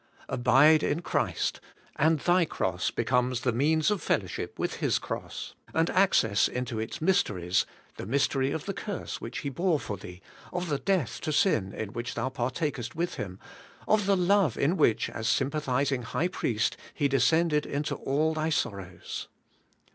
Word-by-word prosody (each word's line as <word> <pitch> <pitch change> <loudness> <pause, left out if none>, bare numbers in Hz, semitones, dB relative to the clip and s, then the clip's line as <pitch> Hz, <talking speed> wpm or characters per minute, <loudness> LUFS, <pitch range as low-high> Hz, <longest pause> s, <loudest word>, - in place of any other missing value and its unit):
Abide 145 +5 +5
in 165 +4 -1
Christ: - - -1 0.3
and 160 +2 +3
thy 175 0 +4
cross 90 - -1
becomes 125 +1 0
the 125 - +1
means 155 - +2
of 205 - -1
fellow 100 - +1
ship 90 - -6
with - - -2
His - - +1
cross, - - -6 0.2
and 165 +1 +2
access 115 - +3
into 125 -3 -3
its 110 +9 -5
mysteries, 95 - +1
— - - -31
the - - -6
mystery 135 +1 +1
of 150 +2 -3
the 195 - -2
curse 205 +1 -5
which - - -5
He 140 - -3
bore 165 +3 +1
for 105 - -5
thee, 90 -1 -10 0.3
of 180 -1 -3
the 145 -2 0
death 185 -11 0
to 155 - -2
sin 115 - +2
in 105 +1 -5
which 120 +1 -4
thou 130 - -1
partakest 130 0 -3
with 170 +2 -1
Him, 90 -2 -5 0.5
of 210 -2 +3
the 200 -1 +4
love 180 - +3
in 155 +6 +2
which, 145 - +3
as 110 0 -4
sympathizing 135 -2 0
High 140 +8 -1
Priest, 115 - -1 0.2
He 145 - +2
descended 150 +4 +2
into 145 +2 -2
all 155 +4 0
thy 155 0 -1
sorrows. 95 - -3
140 Hz, 170 wpm, -28 LUFS, 120-165 Hz, 0.5 s, Abide